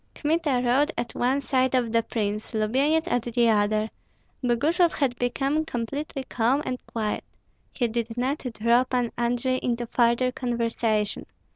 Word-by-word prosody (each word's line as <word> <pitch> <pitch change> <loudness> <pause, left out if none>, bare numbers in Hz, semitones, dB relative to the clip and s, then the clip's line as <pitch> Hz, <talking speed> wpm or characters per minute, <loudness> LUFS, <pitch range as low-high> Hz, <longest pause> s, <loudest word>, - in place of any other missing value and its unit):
Kmita 295 -5 +1
rode 275 +6 +3
at 235 - -3
one 260 +3 +1
side 260 -1 +1
of 240 -3 +1
the 230 0 +3
prince, 215 -1 -3
Lubyenyets 275 +10 +2
at 245 -8 +1
the 235 0 +2
other. 215 0 +2 0.5
Boguslav 315 +9 +2
had 265 -4 0
become 275 +5 0
completely 275 +1 -4
calm 250 +4 +1
and 250 -1 -4
quiet; 215 -2 -2 0.5
he 245 - 0
did 230 0 -3
not 265 +4 0
draw 235 +3 +3
Pan 250 -2 -1
Andrei 245 +2 0
into 240 -1 -1
further 235 +2 +2
conversation. 230 -4 -1
245 Hz, 145 wpm, -25 LUFS, 230-270 Hz, 0.5 s, rode